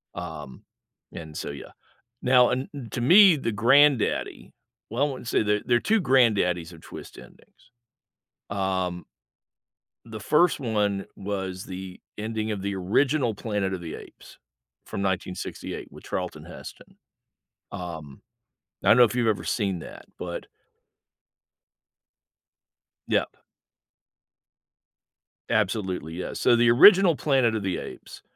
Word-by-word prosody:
Um, 80 -6 -8 0.5
and 80 -2 -8
so, - - -4
yeah. 70 - -10 0.5
Now, 125 -1 +5
and 130 +2 -2
n 130 -5 -8
to - - -3
me, 180 - +7
the 115 - -2
granddaddy 130 +3 +2 0.4
well, 120 +6 +1
I - - -4
wanna 130 - -8
say, 115 - +1
there 105 0 +1
there 120 - +3
are - - -1
2 220 -1 +2
granddaddies 100 - +2
of 80 - -14
twist - - -11
endings, 125 - -18 0.8
um 95 -3 -2 1.0
The 110 -2 -8
first 150 - +2
one 105 -5 -1
was 95 -2 -5
the 95 0 -8 0.2
ending 110 0 -3
of 105 -3 -3
the 100 0 -2
original 120 +6 +1
Planet 105 -3 -2
of 95 - -4
the 80 -2 -7
Apes - - -13 0.5
from - - -6
1968 95 -1 -4
with - - -14
Charlton - - -5
Heston. - - -12 0.7
Um, 80 -6 -8 0.6
I - - -2
don't 115 - +7
know 125 - +8
if 110 - +2
you've 120 -2 +1
ever 110 -2 0
seen 100 -5 -1
that, - - -11
but - - -6 2.6
Yep. - - +1 2.2
Absolutely, 95 -6 -1
yeah. 90 - -5
So, 120 - +3
the 120 0 +4
original 180 - +7
Planet 130 -7 +2
of 110 - -2
the 95 -2 -2
Apes - - -10
105 Hz, 130 wpm, -25 LUFS, 95-125 Hz, 2.6 s, know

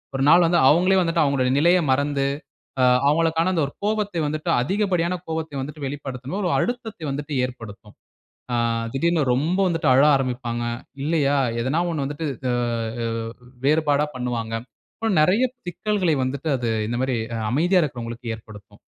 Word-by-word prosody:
ஒரு 135 - 0
நாள் 170 +2 +7
வந்து 170 +1 +3
அவங்களே 185 +4 +4
வந்துட்டு, 165 -2 +2
அவங்களுடைய 130 -2 +1
நிலைய 175 +4 +4
மறந்து, 140 +1 +1 0.6
அ - - +4 0.3
அவங்களுக்கான 165 +3 +2
அந்த 165 - +1
ஒரு 140 - -10
கோபத்தை 210 -4 -1
வந்துட்டு 155 +1 -2
அதிகப்படியான 180 +1 0
கோபத்தை 160 -2 -4
வந்துட்டு 150 +1 -7
வெளிப்படுத்தும். 135 +3 -5
ஒரு 180 - 0
அழுத்தத்தை 225 -8 -3
வந்துட்டு 145 +2 -5
ஏற்படுத்தும். 110 -4 -11 0.6
ஆ - - +2 0.4
திடீர்னு 165 +3 +1
ரொம்ப 160 +8 0
வந்துட்டு 165 -2 -1
அழ 135 +2 +5
ஆரம்பிப்பாங்க 125 -3 -2 0.4
இல்லையா? 145 -2 +1 0.2
ஏதாவது 135 +8 0
ஒண்ண 155 -4 -2
வந்துட்டு, 145 +3 -4 0.3
அ-அ 115 -1 -2 0.6
வேறுபாடா 150 0 +2
பண்ணுவாங்க. 120 -3 -3 0.5
அப்ப 225 - 0
நிறைய 185 +10 +3 0.2
சிக்கல்களை 185 -1 0
வந்துட்டு 135 +4 -3
அது 120 -2 -2 0.2
இந்த 120 +2 -2
மாதிரி, 130 -2 0 0.3
அமைதியா 175 +8 +3
இருக்குறவர்களுக்கு 120 -4 -4
ஏற்படுத்தும். 105 -2 -15
145 Hz, 145 wpm, -23 LUFS, 125-170 Hz, 0.6 s, நாள்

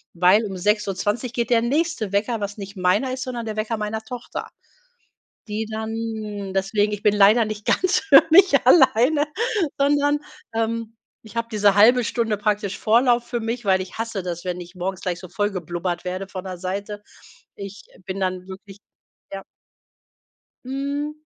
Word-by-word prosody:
weil 185 +5 +5
um 195 -3 -5
6:20 210 +4 -1
geht 235 -1 -2
der 230 -1 +4
nächste 280 - -1
Wecker, 215 +3 0
was 205 +1 -5
nicht 200 0 -8
meiner 195 +8 +1
ist, 255 - -5
sondern 240 -3 -5
der 215 -1 -4
Wecker 215 +1 -2
meiner 215 +1 -3
Tochter, 240 +2 -7 1.0
die 215 +1 -3
dann 220 -2 -4
deswegen, 205 +2 +1
ich 210 - -4
bin 210 - +3
leider 210 +3 +5
nicht 215 -1 -6
ganz 370 +1 +2
für 400 - +7
mich 375 +3 +6
alleine, 285 0 +5 0.5
sondern, 290 +1 +2 0.3
ähm, 225 0 -2 0.3
ich 220 +1 -14
habe 230 0 -1
diese 205 -2 +3
1/2 235 +4 +6
Stunde 225 -1 -1
praktisch 205 -1 -1
Vorlauf 240 +2 +3
für 240 -1 -3
mich, 230 +2 -4
weil 190 -1 +3
ich 185 - -11
hasse 225 -3 -3
das, 175 -1 -5
wenn 180 0 -3
ich 175 +1 -11
morgens 185 +1 -4
gleich 180 -2 -2
so 185 - -10
vollgeblubbert 180 -3 -3
werde 185 +1 -4
von 190 -1 -7
der 185 -1 -6
Seite. 200 +3 -5 0.5
Ich 200 0 -8 0.2
bin 190 +1 -4
dann 185 -1 -2
wirklich 195 +1 -11 0.5
ja. 195 0 -5 1.2
Mhm 285 +3 -4
210 Hz, 165 wpm, -22 LUFS, 195-235 Hz, 1.2 s, für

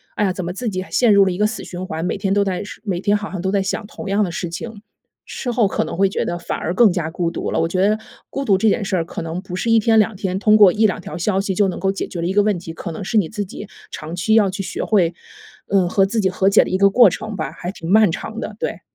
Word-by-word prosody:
哎 210 - 0
呀， 195 - +2
怎 185 -1 -5
么 175 - -4
自 230 +5 -3
己 185 -2 -3
还 - - -17
陷 240 -3 +4
入 200 -1 +6
了 190 - +1
一 180 - -5
个 210 - +4
死 215 -1 -6
循 180 0 -7
环。 160 0 -4
每 185 - -1
天 195 0 0
都 205 - +3
在 190 -1 -2
事 205 - -10
每 185 -4 -1
天 205 +1 +2
好 205 0 -7
像 185 - -4
都 190 +1 -1
在 200 -1 +1
想 205 +2 -3
同 210 - -9
样 200 +2 +2
的 180 - -2
事 175 - -4
情， 210 +5 -7 0.4
事 250 - -5
后 235 -3 +2
可 - - -1
能 - - -6
会 195 +1 +4
觉 - - -2
得 175 - -2
反 - - -4
而 170 - -3
更 215 +2 +5
加 175 -3 -2
孤 170 0 -2
独 - - -4
了。 - - 0
我 165 - +1
觉 185 +3 +1
得 215 +1 +2 0.3
孤 275 - -3
独 195 -6 +4
这 220 +3 +3
件 210 - 0
事 190 - -1
儿， 165 - -1
可 170 - -6
能 165 +2 -4
不 185 -2 -7
是 230 - -2
1 225 - +6
天 225 +1 +3
2 215 0 +2
天， 190 -1 -2
通 210 +1 +4
过 205 -4 +8
1-2 215 -3 +2
条 160 -2 -7
消 190 +3 0
息 195 -1 -2
就 205 +1 +3
能 185 - -4
够 190 +1 +1
解 195 - -4
决 170 - -6
的 170 - -1
一 185 - -1
个 205 +1 +4
问 205 -2 +1
题。 165 -1 -8
可 170 - -6
能 165 - -6
是 220 +4 -1
你 185 -7 +2
自 210 -2 -3
己 200 +2 -9 0.2
长 160 +2 -6
期 185 +5 0
要 210 -3 +4
去 190 +1 -4
学 - - -4
会， 180 -6 +2 0.5
呃， 190 -3 +2
和 195 +1 +3
自 220 +4 -2
己 190 - +2
和 190 +1 +2
解 200 - +5
的 - - -6
一 185 - 0
个 200 +1 +5
过 235 +1 +6
程 220 +4 -6
吧， 155 -6 -4
还 175 +2 -6
挺 165 -4 -8
漫 215 -3 +5
长 220 +7 -6
的， 220 - -6
对。 - - -3
195 Hz, 335 characters per minute, -20 LUFS, 180-210 Hz, 0.5 s, 过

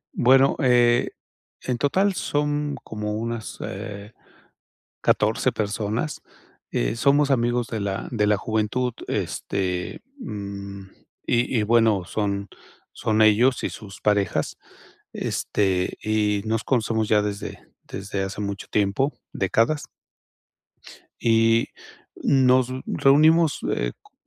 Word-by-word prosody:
Bueno, 135 +2 +5
eh, 120 -1 +4 0.5
en 125 -2 -2
total 190 +8 +2
son 145 -3 -1
como 105 -1 -4
unas, 115 0 -4
eh, 100 +2 -7 0.9
14 - - +2
personas, 110 +6 -2 0.5
eh, - - 0
somos 140 +4 +3
amigos 120 -1 +1
de 110 -2 -4
la 100 -1 -3
de 105 -3 +1
la 105 - +4
juventud, 110 +4 -1
este, 90 -2 -3 0.2
mm, 100 - -7 0.4
y 120 0 +1
y - - +1
bueno, 110 -4 +3
son 100 0 -2 0.4
son 110 0 +1
ellos 115 +4 +4
y - - -1
sus 100 -2 -10
parejas, 100 -4 0 0.6
este, 95 -3 -1
y 105 -2 +1
nos 110 0 -1
conocemos 110 -3 0
ya 105 -1 +4
desde 105 -1 -5 0.2
desde 95 0 -4
hace 95 +1 -6
mucho 100 -1 -4
tiempo, 105 +8 +1 0.2
décadas. 115 - +1 1.4
Y 115 0 +3 0.5
nos 130 -2 +3 0.2
reunimos, 155 +3 +4
eh, - - -1
cu - - -25
110 Hz, 110 wpm, -24 LUFS, 100-125 Hz, 1.4 s, Bueno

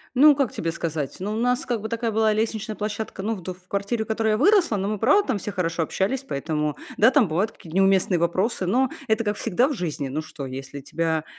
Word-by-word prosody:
Ну, 295 +3 +8
как 275 -4 0
тебе 165 0 -2
сказать? 160 -4 -3
Ну, 200 +3 -2
у - - -2
нас 245 +2 +1
как 235 -4 -1
бы 220 - -4
такая 230 0 -1
была 220 0 +3
лестничная 220 0 -2
площадка, 210 -1 -4
ну, 220 +3 -1
в 185 - -9
д 185 +2 -4
в 180 0 -19
квартире, 200 +3 -1
в - - -19
которой 220 0 +1
я 215 - +3
выросла. 345 - +4
Но 195 0 -1
мы, 210 0 -2
правда, 295 - +3
там 210 - +1
все 205 +1 -5
хорошо 170 -3 -1
общались. 210 - -1
Поэтому 150 +1 -2 0.2
да, 225 +4 +6
там 260 - +4
бывают 190 +8 0
какие-то 165 +1 -10
неуместные 195 -2 +3
вопросы, 185 +4 0
но 255 +8 +2 0.2
это 220 +1 +1
как 205 0 -1
всегда 235 +6 +1
в 295 - -2
жизни. 155 - -3
Ну 150 +4 -3
что, 155 -3 -8
если 135 +2 -7
тебя, 160 +2 -1
205 Hz, 245 wpm, -24 LUFS, 165-225 Hz, 0.2 s, Ну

